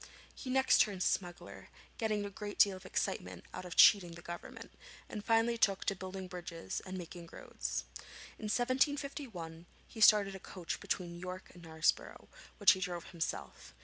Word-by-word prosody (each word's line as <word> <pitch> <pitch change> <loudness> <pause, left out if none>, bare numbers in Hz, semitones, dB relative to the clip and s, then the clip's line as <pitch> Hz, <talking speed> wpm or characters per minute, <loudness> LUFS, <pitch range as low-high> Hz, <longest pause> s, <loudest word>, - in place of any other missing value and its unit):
He 255 - -8
next 265 +1 +4
turned 195 -4 +1
smuggler, 175 -2 -3 0.3
getting 215 -3 0
a 200 - -6
great 205 +1 -6
deal 200 -2 +6
of 185 - -11
excitement - - -3
out - - -6
of 180 - -7
cheating 180 -5 +7
the 170 0 -11
Government, 175 0 -8 0.4
and 210 -2 -6
finally 230 +1 +2
took 195 -3 +2
to 200 - +1
building 185 0 -6
bridges 175 -2 -5
and 185 0 -5
making 170 -1 -8
roads. - - -4 0.6
In 220 - -6
1751 250 - -1 0.2
he 220 - -9
started 205 -2 +7
a 190 - -7
coach 180 -2 -5
between 175 -2 -3
York 185 +1 -7
and 175 - -14
Knaresborough, 160 -1 -1 0.3
which 205 - +7
he 190 - 0
drove 175 -2 -4
himself. 165 - -5
190 Hz, 165 wpm, -34 LUFS, 175-215 Hz, 0.6 s, cheating